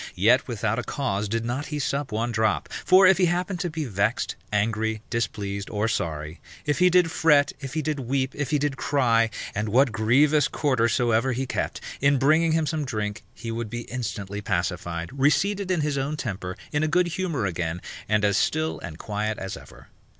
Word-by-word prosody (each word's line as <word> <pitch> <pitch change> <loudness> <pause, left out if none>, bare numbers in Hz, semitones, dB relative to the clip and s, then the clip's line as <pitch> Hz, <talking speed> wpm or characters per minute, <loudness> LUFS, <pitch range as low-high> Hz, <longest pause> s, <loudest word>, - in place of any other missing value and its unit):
Yet 115 +8 +4
without 115 -1 -1
a - - -3
cause 105 -7 -2
did 115 +1 -1
not 125 +5 -3
he 150 - -4
sup 140 -1 -2
one 115 +3 -1
drop; 110 -1 +1 0.2
for 185 +1 +7
if 190 0 +6
he 185 - +5
happened 180 +1 -1
to 175 0 -1
be 155 -1 -3
vexed, 105 +1 -1 0.2
angry, 110 +1 0
displeased, 100 -4 -2
or 105 0 0
sorry, 80 -6 -3 0.2
if 150 +1 0
he 180 0 +6
did 180 -2 +4
fret, 150 -3 +4
if 135 +1 -7
he 155 - 0
did 150 0 -1
weep, 130 +1 -1
if 145 -3 -3
he 150 - +2
did 145 -1 -1
cry, 115 -5 +2 0.2
and 105 +1 -2
what 130 +3 +4
grievous 140 +8 +3
quarter 130 -6 +1
soever 120 +1 +2
he 130 +3 -2
kept, 125 - -3 0.2
in 140 0 +4
bringing 155 +5 +3
him 160 -1 +2
some 155 -1 -1
drink, 105 -5 -3
he 115 -1 -6
would 115 -1 -4
be 120 +1 -4
instantly 105 -5 -5
pacified, 85 -2 -2
reseated 185 +8 +1
in 180 -4 +1
his 145 -2 0
own 145 +3 -2
temper, 95 -8 -4
in 150 - 0
a 155 - +2
good 180 +3 +3
humour 165 - -2
again, 85 -2 -2 0.3
and 105 -1 +3
as 100 -1 +2
still 155 +1 0
and 80 -2 -8
quiet 105 +3 -3
as 95 0 -5
ever. - - -14
125 Hz, 200 wpm, -25 LUFS, 105-150 Hz, 0.3 s, for